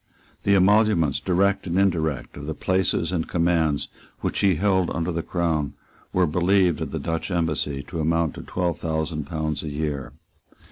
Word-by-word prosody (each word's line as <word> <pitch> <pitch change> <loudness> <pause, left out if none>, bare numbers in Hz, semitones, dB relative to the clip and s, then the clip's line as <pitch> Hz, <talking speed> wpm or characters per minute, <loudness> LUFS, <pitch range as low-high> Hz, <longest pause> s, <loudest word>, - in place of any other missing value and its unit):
The 100 - +3
emoluments, 100 -6 +4
direct 95 +2 +1
and 85 +1 -1
indirect, 80 -7 0
of 70 0 -8
the 80 - -3
places 90 -2 0
and 85 -3 -1
commands 85 -4 +1 0.3
which - - -1
he 95 -3 +4
held 95 +1 +2
under 85 +2 -2
the 85 0 -1
Crown 80 -4 -1 0.4
were 90 -1 +3
believed 90 +1 +2
at - - -2
the - - -4
Dutch 80 +3 -3
Embassy 80 -5 -1
to 85 +1 -6
amount 80 -1 +1
to - - -8
twelve 85 -2 -2
thousand 80 -2 -2
pounds 80 -1 -2
a 80 - -5
year. 70 -3 -3
85 Hz, 170 wpm, -24 LUFS, 80-90 Hz, 0.4 s, emoluments